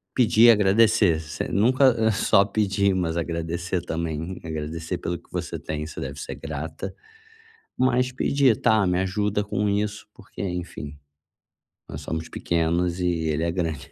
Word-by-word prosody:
Pedir, 120 -1 +6
agradecer, 105 -4 +4
você 80 0 -5
nunca 130 +5 +4
eh, 110 0 +3
só 100 -1 +4
pedir, 100 -1 +1
mas 85 -3 -1
agradecer 85 +2 -2
também, 85 +2 -4
agradecer 80 +2 -4
pelo 85 0 -3
que - - -27
você - - -4
tem, 75 0 -4
você 80 - -8
deve 70 +1 -6
ser - - -6
grata. 80 +1 -6 0.8
Mas 125 0 +2
pedir: 130 -2 +2
tá, 110 -3 +3
me 90 0 +1
ajuda 105 +2 0
com 105 0 -1
isso, 105 +1 -2
porque, - - -10
enfim, 90 -5 -5 0.9
nós 70 - -7
somos 80 +2 -4
pequenos 85 +1 0
e 90 - 0
ele 80 -2 0
é 85 - 0
grande. 80 -6 -3
90 Hz, 150 wpm, -24 LUFS, 80-105 Hz, 0.9 s, Pedir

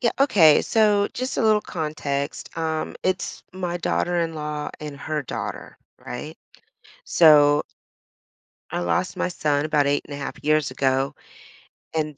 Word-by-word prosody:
Yeah, 235 - +2
okay. 180 - +6
So, 210 -2 +3
just 255 +1 -3
a - - +1
little 215 -1 +4
context, 150 -5 -4
um, 160 -1 -2
it's 185 0 -2
my 180 -2 -3
daughter-in-law 160 -4 -2
and 150 -2 -7
her 150 +1 -3
daughter, 125 - -6 0.3
right? 150 +6 -6 0.7
So, 150 - +6 1.1
I - - -2
lost 90 - -1
my - - -1
son 150 -4 0
about 150 -2 +2
8.5 145 0 -3
years 155 -2 +2
ago, 135 +1 0 0.8
and 155 -2 -2
155 Hz, 125 wpm, -23 LUFS, 145-175 Hz, 1.1 s, okay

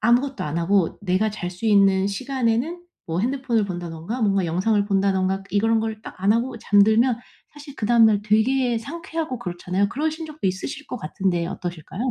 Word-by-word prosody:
아무것도 255 +4 +2
안 150 +2 -3
하고 180 +1 +1
내가 200 +3 +1
잘 180 -4 -5
수 185 +5 -5
있는 195 -2 +4
시간에는 260 - -1 0.2
뭐 165 +1 -2
핸드폰을 245 -2 0
본다든가 175 +5 -5
뭔가 195 -3 +2
영상을 195 +6 +1
본다든가 195 -1 +1
이런 225 +2 +2
걸 220 -1 -4
딱 - - -9
안 200 - +5
하고 235 +1 -1
잠들면 220 +4 +4 0.3
사실 290 -1 -11
그다음 230 +1 +5
날 205 -2 +2
되게 235 +3 +2
상쾌하고 320 0 -5
그렇잖아요. 180 +2 -1
그러신 315 +6 -3
적도 305 -6 -4
있으실 190 +10 -4
것 - - -5
같은데 175 +1 -1
어떠실까요? 180 - -4
215 Hz, 390 characters per minute, -23 LUFS, 190-250 Hz, 0.3 s, 안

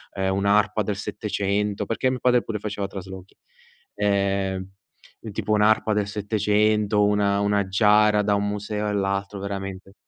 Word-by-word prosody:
ehm, 95 -1 0
un'arpa 100 +1 +2
del 105 0 -2
'700, 100 0 -2
perché 115 +4 0
mio 130 - -2
padre 125 -1 +3
pure 110 -2 -4
faceva 105 -1 -4
traslochi. 95 -1 -10 0.6
Ehm, 100 -2 0 0.5
e 110 - -8
tipo 105 - -4
un'arpa 110 +1 +3
del 105 -1 0
'700, 105 0 +1
una 100 -1 +2
una 100 -1 +1
giara 105 +2 +4
da 105 0 +1
un 100 0 0
museo 105 +1 -3
all'altro, 100 0 -2
veramente 95 -1 -6
105 Hz, 145 wpm, -24 LUFS, 100-105 Hz, 0.6 s, giara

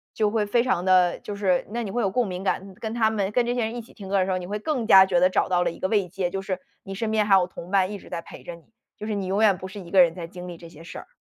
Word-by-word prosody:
就 215 -2 +1
会 215 -2 0
非 235 +3 +2
常 180 -8 0
地 180 -2 +4
就 205 - -7
是 185 -3 0
那 235 +2 -3
你 200 - -5
会 240 +2 -1
有 195 - +1
共 245 +5 0
鸣 185 0 -5
感， 195 -1 -2
跟 220 0 -4
他 220 -2 +2
们 200 -2 -1
跟 240 +2 +2
这 240 - -1
些 245 - -1
人 225 +2 -5
一 240 - -4
起 - - -18
听 195 -3 -10
歌 200 - -1
儿 - - +3
的 - - +1
时 190 - -2
候， 185 - 0
你 175 - -7
会 205 +2 -3
更 240 0 -2
加 190 -3 +8
觉 180 -2 +1
得 185 - +4
找 - - +1
到 180 -1 +2
了 180 - +1
一 - - -9
个 185 - -1
慰 200 -3 +1
藉， 180 0 -3
就 195 0 -3
是 190 -1 -4 0.2
你 195 - -8
身 220 +2 -2
边 215 -1 +1
还 195 - +6
有 185 - +4
同 180 -1 -10
伴 190 -1 +2
一 205 - -6
直 - - -15
在 170 - -5
陪 - - -12
着 175 - -8
你， 170 - -18 0.3
就 210 - -7
是 215 - -2
你 200 -2 -3
永 200 +3 +1
远 205 -3 +5
不 185 - -6
是 200 +2 -9
一 175 -3 -11
个 190 -2 +7
人 170 -2 +3
在 175 -2 -6
经 180 +1 -9
历 175 -1 -8
这 170 0 -12
些 165 0 -14
事 180 - -9
儿。 - - -10
195 Hz, 395 characters per minute, -24 LUFS, 180-215 Hz, 0.3 s, 加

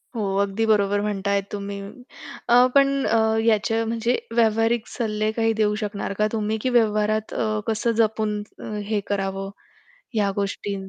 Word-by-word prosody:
हो, 215 - -1 0.2
अगदी 200 +3 0
बरोबर 205 -2 +2
म्हणताय 200 -1 0
तुम्ही. 200 -1 -5 0.7
अ, 245 +1 +7
पण 275 0 +6 0.2
अ, 230 - +3 0.3
याच्या 225 +1 +2
म्हणजे 230 +2 0 0.2
व्यावहारिक 225 0 +2
सल्ले 215 -2 -1
काही 225 0 +1
देऊ 210 0 +2
शकणार 200 -1 -3
का 215 - +3
तुम्ही 220 0 -1
की 255 - 0
व्यवहारात 215 -2 +1
अ, 215 -1 -1
कसं 225 +2 +1
जपून 215 -1 0 0.5
हे 215 -1 0
करावं 195 -1 -2 0.7
ह्या 200 -2 +2
गोष्टी? 200 0 -2
215 Hz, 145 wpm, -23 LUFS, 205-225 Hz, 0.7 s, अ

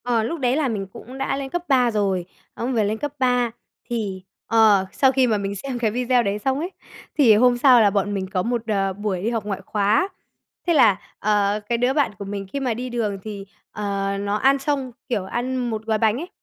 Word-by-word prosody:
Ờ, 235 -2 +1
lúc 330 +9 -3
đấy 250 -1 +1
là 300 -2 +1
mình 205 -5 -3
cũng 255 +3 -10
đã 270 0 -1
lên 275 -1 -4
cấp 350 +4 -3
3 250 -4 +3
rồi, 195 -4 0 0.3
ông 250 +3 -3
về 225 -3 +2
lên 215 +2 -1
cấp 290 +3 -4
3 250 -2 +2 0.4
thì 205 -6 -3 0.2
ờ, 215 -4 +4
sau 265 -1 +3
khi 260 -1 +3
mà 220 -3 +2
mình 200 0 -3
xem 250 +5 -5
cái 225 -3 +1
video 245 +1 +2
đấy 200 0 -1
xong 265 +5 0
ấy, 345 +5 -3 0.5
thì 240 -8 +6
hôm 245 +2 +4
sau 250 -2 +6
là 210 - +5
bọn 200 0 0
mình 190 -1 -2
có 185 -1 0
một, 235 0 -2
đở, 195 -3 0
buổi 200 -2 -3
đi 225 - +1
học 225 -3 -2
ngoại 195 -2 -3
khóa. 210 - +2 0.6
Thế 340 - +4
là, 225 -10 +5 0.2
ờ, 205 0 +1
cái 235 - +2
đứa 245 +2 +2
bạn 285 -5 +2
của 200 - -5
mình 195 0 -5
khi 280 - -1
mà 255 -4 0
đi 250 +3 -5
đường 215 -5 -2
thì, 205 -2 -7 0.3
ờ, 200 -1 -2
nó 200 0 -1
ăn 270 +5 +3
xong, 275 -2 -2 0.2
kiểu, 205 -6 -1
ăn 245 +6 -2
một 220 -1 -4
gói 220 -1 +1
bánh 220 0 +2
ấy, 340 +6 -6
225 Hz, 235 wpm, -22 LUFS, 205-255 Hz, 0.6 s, thì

